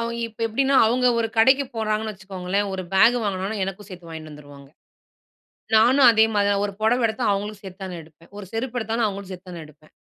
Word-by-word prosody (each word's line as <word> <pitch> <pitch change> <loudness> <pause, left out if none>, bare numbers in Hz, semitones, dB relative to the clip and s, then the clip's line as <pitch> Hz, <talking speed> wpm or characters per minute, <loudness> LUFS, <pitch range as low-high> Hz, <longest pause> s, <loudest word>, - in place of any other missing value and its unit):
அவ் 230 0 -3
இப்போ 230 0 -15
எப்படின்னா 270 +5 +1
அவங்க 250 +3 +1
ஒரு 225 -1 0
கடைக்கு 265 +5 +5
போறாங்கன்னு 215 0 -1
வச்சுக்கோங்களேன், 190 +1 -3
ஒரு 185 - -4
பேக் 230 +5 +5
வாங்குனாங்கனா 200 +1 -3
எனக்கும் 195 +1 -7
சேர்த்து 180 -3 -11
வாங்கின்னு 160 -1 -9
வந்துருவாங்க. 145 -2 -14 1.1
நானும் 250 +4 +6
அதே 220 -1 +5
மாரி 205 -1 +2
தான், 200 0 +1
ஒரு 205 - -3
புடவ 235 +3 +2
எடுத்தா 220 0 -3
அவங்களுக்கும் 205 +1 -4
சேர்த்து 190 0 -10
தான் 180 -2 -6
எடுப்பேன். 160 +1 -21
ஒரு 205 - -7
செருப்பு 235 +2 -4
எடுத்தாலும், 225 0 -1
அவங்களும் 200 -1 -6
சேர்த்து 185 0 -10
தான் 175 - -8
நான் 160 - -9
எடுப்பேன். 155 0 -21
205 Hz, 205 wpm, -23 LUFS, 185-225 Hz, 1.1 s, நானும்